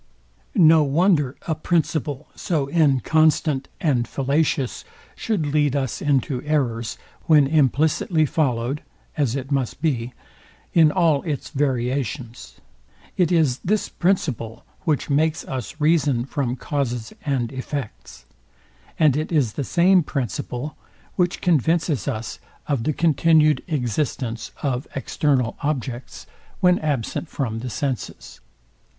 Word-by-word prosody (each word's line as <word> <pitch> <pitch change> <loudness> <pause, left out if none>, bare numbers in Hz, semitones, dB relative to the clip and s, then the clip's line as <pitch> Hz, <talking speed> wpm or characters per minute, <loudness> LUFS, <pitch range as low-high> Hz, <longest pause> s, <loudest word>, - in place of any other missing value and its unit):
No 160 -5 +6
wonder 150 -2 +2
a 160 - +1
principle 155 -3 -1
so 150 -6 -1
inconstant 155 -1 +2
and 135 - +1
fallacious 140 -1 0 0.3
should 205 -9 -1
lead 145 -1 +1
us 135 -4 -2
into 135 -3 +1
errors, 125 -7 -1 0.3
when 150 -3 +6
implicitly 155 +3 +2
followed 135 -2 0 0.3
(as 135 -5 0
it 135 +1 -5
must 135 -3 -1
be) 125 -6 -1 0.6
in 160 -3 +6
all 165 -6 +3
its 150 -5 -4
variations. 130 -3 -2 0.6
It 180 -2 +2
is 155 -7 +2
this 210 +3 0
principle, 140 - -1 0.2
which 155 -3 0
makes 155 +2 +1
us 130 +3 -6
reason 150 -6 +2
from 135 -3 -2
causes 125 -5 -3
and 130 -5 -1
effects; 130 - -6 0.7
and 150 -5 +4
it 155 +3 -2
is 140 -10 +2
the 140 - -3
same 180 +5 +4
principle, 130 - -4 0.4
which 180 0 0
convinces 165 -3 +1
us 115 -5 -4 0.3
of 135 -6 -1
the 155 - +1
continued 155 -2 +3
existence 125 - -2
of 135 -2 -1
external 135 -3 0
objects, 130 -4 -4 0.3
when 180 -1 +4
absent 150 +1 -2
from 115 -5 -3
the 125 +2 -5
senses. 130 +4 -4
145 Hz, 120 wpm, -22 LUFS, 125-155 Hz, 0.7 s, No